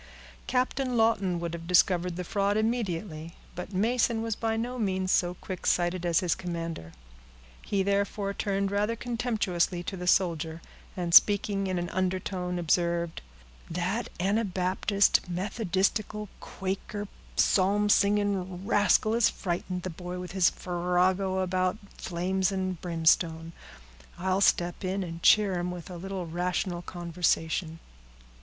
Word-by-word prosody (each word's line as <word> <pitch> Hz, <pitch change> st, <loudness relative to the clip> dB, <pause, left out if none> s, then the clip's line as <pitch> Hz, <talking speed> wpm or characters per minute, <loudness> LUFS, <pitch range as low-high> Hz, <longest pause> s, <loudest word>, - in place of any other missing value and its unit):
Captain 255 Hz, 0 st, 0 dB
Lawton 200 Hz, -6 st, +2 dB
would 170 Hz, -1 st, -4 dB
have 165 Hz, 0 st, -7 dB
discovered 180 Hz, 0 st, +3 dB
the 180 Hz, -, -4 dB
fraud 200 Hz, +3 st, 0 dB
immediately, 190 Hz, -8 st, -2 dB, 0.2 s
but 180 Hz, +3 st, -7 dB
Mason 225 Hz, +3 st, +1 dB
was 225 Hz, -2 st, -2 dB
by 225 Hz, 0 st, -1 dB
no 245 Hz, +2 st, -3 dB
means 190 Hz, -3 st, 0 dB
so 175 Hz, 0 st, +2 dB
quick 185 Hz, +1 st, -6 dB
sighted 175 Hz, 0 st, +1 dB
as 170 Hz, +2 st, +3 dB
his 180 Hz, -2 st, +1 dB
commander. 165 Hz, -, -5 dB, 0.7 s
He 195 Hz, -2 st, 0 dB
therefore 200 Hz, 0 st, 0 dB
turned 200 Hz, -1 st, -1 dB
rather 210 Hz, +3 st, 0 dB
contemptuously 220 Hz, -8 st, -1 dB
to 190 Hz, -, -5 dB
the 180 Hz, -1 st, -6 dB
soldier, 165 Hz, -3 st, +1 dB, 0.4 s
and, 175 Hz, -2 st, -2 dB
speaking 200 Hz, 0 st, +5 dB
in 185 Hz, -1 st, -1 dB
an 175 Hz, 0 st, -2 dB
undertone, 185 Hz, -1 st, -2 dB
observed, 170 Hz, 0 st, 0 dB, 0.5 s
"That 180 Hz, +7 st, -2 dB
anabaptist, 195 Hz, 0 st, +1 dB
methodistical, 200 Hz, +2 st, -1 dB
quaker, 195 Hz, +2 st, -5 dB, 0.3 s
psalm 200 Hz, +2 st, +3 dB
singing 200 Hz, -3 st, +1 dB
rascal 205 Hz, +2 st, +3 dB
has 230 Hz, -1 st, +4 dB
frightened 180 Hz, 0 st, -3 dB
the 185 Hz, -, -4 dB
boy, 180 Hz, +2 st, -6 dB
with 180 Hz, 0 st, -6 dB
his 185 Hz, -2 st, +4 dB
farrago 180 Hz, +2 st, 0 dB
about 185 Hz, +1 st, 0 dB, 0.2 s
flames 185 Hz, +2 st, -1 dB
and 185 Hz, -2 st, -3 dB
brimstone. 165 Hz, -1 st, +1 dB, 0.6 s
I'll 185 Hz, +2 st, 0 dB
step 175 Hz, -1 st, +2 dB
in 190 Hz, +1 st, -1 dB
and 165 Hz, -1 st, -7 dB
cheer 200 Hz, -3 st, +5 dB
him 175 Hz, +1 st, -2 dB
with 180 Hz, 0 st, -7 dB
a 175 Hz, -, -6 dB
little 190 Hz, 0 st, -5 dB
rational 175 Hz, +1 st, -2 dB
conversation." 170 Hz, -1 st, -1 dB
185 Hz, 135 wpm, -28 LUFS, 175-200 Hz, 0.7 s, speaking